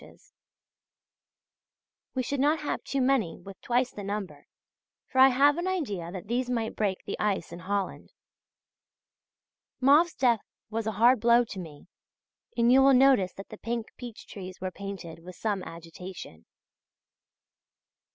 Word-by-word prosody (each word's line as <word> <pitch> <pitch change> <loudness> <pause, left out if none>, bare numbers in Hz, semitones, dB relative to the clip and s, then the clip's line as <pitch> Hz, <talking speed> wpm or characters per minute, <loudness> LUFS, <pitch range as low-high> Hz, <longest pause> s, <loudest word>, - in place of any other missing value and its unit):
We 255 - 0
should 280 +3 -2
not 295 +3 +2
have 295 - -3
too 275 - -1
many 250 -11 +1
with 195 +2 -12
twice 250 +1 +1
the 205 - -8
number; 195 -8 -5 0.6
for 260 - 0
I 265 - +10
have 285 +4 +4
an 350 - -2
idea 210 - -2
that 185 +1 -7
these 245 +2 -1
might 230 -3 -2
break 200 -3 -1
the - - -5
ice 195 -5 -1
in 170 - -8
Holland. 195 +1 -3 1.7
Mauve's 295 +6 +5
death 240 -4 +3 0.3
was 225 0 -2
a 220 - -1
hard 240 +4 +5
blow 235 +2 +5
to 200 - -8
me, 155 -5 -10 0.7
and 235 +1 +4
you 265 +1 +7
will 270 0 +6
notice 250 -8 +4
that 195 - -10
the - - -9
pink 230 -1 -4
peach 240 -3 -9
trees 185 -2 -9
were 185 0 -3
painted 190 -4 -7
with 180 +2 -11
some 205 -3 -2
agitation. 165 - -10
220 Hz, 150 wpm, -28 LUFS, 185-255 Hz, 1.7 s, I